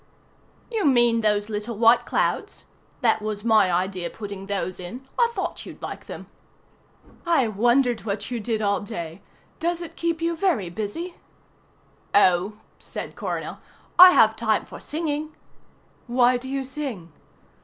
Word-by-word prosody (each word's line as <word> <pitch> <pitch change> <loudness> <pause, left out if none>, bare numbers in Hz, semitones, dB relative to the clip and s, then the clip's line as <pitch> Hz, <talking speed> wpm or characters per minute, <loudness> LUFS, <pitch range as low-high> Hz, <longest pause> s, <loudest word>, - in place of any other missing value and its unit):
"You 445 -3 -1
mean 240 -5 +4
those 210 -1 +1
little 215 +1 -4
white 230 +2 +5
clouds? - - -1 0.4
That 225 -3 +3
was 210 -1 -4
my 220 -5 +4
idea 180 0 -1
putting 200 -2 -8
those 190 -3 -3
in. 240 +9 -8
I 475 -1 +5
thought - - -3
you'd - - -11
like - - -7
them." - - -8 1.0
"I 330 -8 +3
wondered 240 +3 +2
what 205 +2 -4
you 240 - -2
did 220 0 -2
all 200 0 +2
day. 170 -4 -6 0.4
Does 340 +1 0
it 335 -1 -8
keep 335 -1 -1
you 335 0 0
very 315 - 0
busy?" 220 - -5 1.0
"Oh," 185 0 +4 0.3
said - - -7
Coronel, - - -4 0.4
"I 365 0 +13
have - - +5
time - - 0
for - - -10
singing." 305 -1 -3 0.7
"Why 245 +1 +4
do 255 +2 -5
you 275 0 -2
sing?" 260 - -6
230 Hz, 145 wpm, -24 LUFS, 200-290 Hz, 1.0 s, I